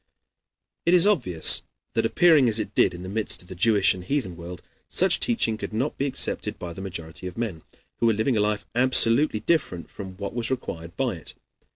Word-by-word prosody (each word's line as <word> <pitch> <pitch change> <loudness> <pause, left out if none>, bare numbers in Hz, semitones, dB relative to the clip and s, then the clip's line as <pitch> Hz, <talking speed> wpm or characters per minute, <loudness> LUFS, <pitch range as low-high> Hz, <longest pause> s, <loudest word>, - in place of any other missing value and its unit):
It 170 +2 +3
is 175 - +4
obvious 120 - +3 0.3
that, - - +1
appearing 155 -8 +4
as 110 0 +2
it 105 -1 -5
did - - +2
in 90 - -9
the - - -7
midst 105 -1 +1
of 90 - -20
the - - -7
Jewish 100 +1 +3
and 90 -1 -9
heathen 100 -5 -2
world, 85 +1 -10 0.3
such 185 -1 +3
teaching 115 - 0
could - - -6
not 130 +7 -2
be 140 - 0
accepted 135 - 0
by 85 -1 -7
the 95 - -9
majority 90 -2 -7
of 90 - -9
men, 105 -9 -4 0.4
who 115 - +2
were 115 - +3
living 110 +4 0
a - - +1
life 105 0 -1
absolutely 120 -1 +3
different 110 - -1
from 95 -2 -9
what 100 +2 -6
was 115 -1 -3
required 85 -10 -6
by - - -1
it. - - -12
110 Hz, 210 wpm, -24 LUFS, 90-130 Hz, 0.4 s, is